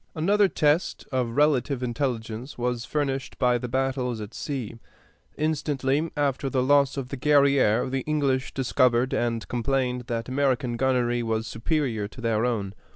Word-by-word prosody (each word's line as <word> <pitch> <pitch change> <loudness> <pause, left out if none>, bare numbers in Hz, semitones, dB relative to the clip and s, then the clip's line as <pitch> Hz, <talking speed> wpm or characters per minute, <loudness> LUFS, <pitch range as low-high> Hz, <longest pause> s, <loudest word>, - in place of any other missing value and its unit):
Another 200 +6 +3
test 155 -1 +1
of 125 -3 -1
relative 145 -3 +2
intelligence 120 0 -3
was 120 -1 -2
furnished 135 -3 -2
by 125 -2 +2
the 125 - -4
battles 130 -2 -1
at 105 +1 -7
sea. 125 -6 -5 0.6
Instantly 150 -1 0
after 140 -1 0
the 130 -1 +1
loss 140 0 +3
of 130 -2 -4
the 140 - -5
Guerrière 140 -5 +3
the 135 +1 -2
English 140 -4 0
discovered 125 -1 +2
and 115 -1 -1
complained 125 0 -1
that 115 -1 -3
American 130 -2 0
gunnery 120 -1 +1
was 110 -1 -1
superior 115 -3 -1
to 110 - -15
their 115 -1 +1
own. 100 -5 -2
130 Hz, 150 wpm, -26 LUFS, 120-140 Hz, 0.6 s, Another